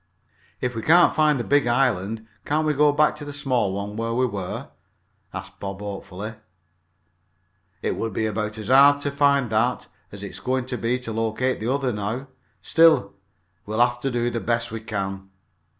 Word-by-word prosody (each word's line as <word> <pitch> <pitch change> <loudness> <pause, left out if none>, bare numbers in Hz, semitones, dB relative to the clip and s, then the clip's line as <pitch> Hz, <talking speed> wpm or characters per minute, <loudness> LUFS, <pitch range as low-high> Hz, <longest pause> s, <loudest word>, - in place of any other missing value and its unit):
"If 125 -1 -2
we 115 - -3
can't 170 +7 +5
find 150 -3 +3
the - - -1
big 145 -1 +2
island, 115 -4 +1 0.2
can't 155 +2 0
we 155 - +2
go 150 +1 +4
back 150 +1 +3
to 150 - -7
the 145 - -6
small 130 -8 0
one 100 +2 -4
where 115 +1 -2
we 130 +1 +2
were?" 100 -6 -5 0.6
asked - - -8
Bob 100 -1 -5
hopefully. 100 +1 -6 1.5
"It - - 0
would 115 - -3
be 110 +3 -1
about 105 0 -2
as 110 +1 -6
hard 140 +2 +7
to 145 - -1
find 140 -4 +2
that 115 +3 +1 0.2
as 100 0 -9
it's 100 - -7
going 130 0 -1
to 125 -1 -4
be 120 +2 0
to 115 -3 -5
locate 115 +3 -1
the 115 +4 -1
other 135 -3 0
now. 110 +7 -4 0.3
Still, 160 -12 +4 0.5
we'll 110 +2 -2
have 120 0 +3
to 135 - -1
do 120 -1 0
the 115 - -2
best 115 0 -1
we 115 - -4
can. 95 -3 -4
120 Hz, 185 wpm, -24 LUFS, 105-135 Hz, 1.5 s, hard